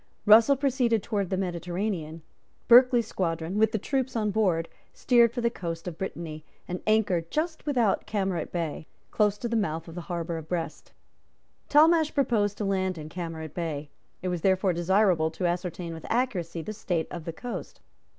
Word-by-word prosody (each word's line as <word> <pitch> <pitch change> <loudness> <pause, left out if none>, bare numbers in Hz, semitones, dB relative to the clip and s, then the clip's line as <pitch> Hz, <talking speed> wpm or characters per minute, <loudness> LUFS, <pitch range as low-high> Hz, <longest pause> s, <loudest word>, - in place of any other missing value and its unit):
Russell 225 +6 +7
proceeded 250 -6 +1
towards 200 -5 -2
the 190 - -1
Mediterranean. 175 -2 -3 0.4
Berkeley's 245 -1 +7
squadron, 170 -1 -2
with 220 0 +4
the 220 - 0
troops 260 +4 -2
on 215 -2 0
board, 180 -6 +1 0.3
steered 235 -2 +4
for 240 0 -3
the 235 0 +1
coast 165 -4 -5
of 170 -2 -6
Brittany, 165 -5 -5 0.2
and 180 0 -4
anchored 195 -6 +2
just 315 0 -2
without 240 -8 +1
Camaret 195 -4 -2
Bay, 165 -3 -3 0.2
close 210 -1 +2
to 235 - -3
the 235 - -2
mouth 165 -6 -1
of 165 - -9
the 175 - -6
harbour 170 -1 -3
of 155 - -11
Brest. 170 -2 -4 0.8
Talmash 315 +1 +5
proposed 215 -7 +1
to 210 - -2
land 190 -2 0
in 155 0 -7
Camaret 160 -3 -6
Bay. 155 -4 -4 0.3
It 185 - -1
was 175 -2 -2
therefore 190 0 +2
desirable 175 -1 +2
to 170 +3 -4
ascertain 175 -1 -2
with 160 - -9
accuracy 185 -9 -1
the 215 - -5
state 175 -6 -2
of 170 -3 -6
the 165 - -4
coast. 245 +8 -7
190 Hz, 175 wpm, -27 LUFS, 165-225 Hz, 0.8 s, Russell